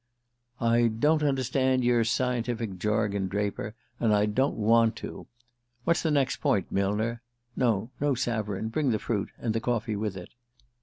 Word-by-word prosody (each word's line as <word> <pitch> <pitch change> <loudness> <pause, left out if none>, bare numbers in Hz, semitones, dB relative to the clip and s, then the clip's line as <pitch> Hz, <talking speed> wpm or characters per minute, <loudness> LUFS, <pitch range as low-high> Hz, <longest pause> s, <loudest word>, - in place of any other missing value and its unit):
"I 115 0 +3
don't 150 +8 +2
understand 130 -2 +1
your 120 -1 +3
scientific 115 -4 -1
jargon, 105 -1 0
Draper; 105 +2 -3 0.2
and 110 -2 +3
I 105 0 +3
don't 130 +7 +1
want 115 +1 +3
to. - - -8 0.6
What's 170 +5 +2
the 160 - 0
next 140 -3 +1
point, 95 - 0
Millner? 105 +4 0 0.3
(No; 115 -2 +1
no 145 -1 +1
savarin. 110 -4 -2
Bring 140 +4 0
the 110 - +2
fruit 105 -1 -2
and 115 -2 -2
the 115 - 0
coffee 115 -2 -1
with 105 -2 -3
it.)" 90 - -9
115 Hz, 155 wpm, -28 LUFS, 105-125 Hz, 0.6 s, I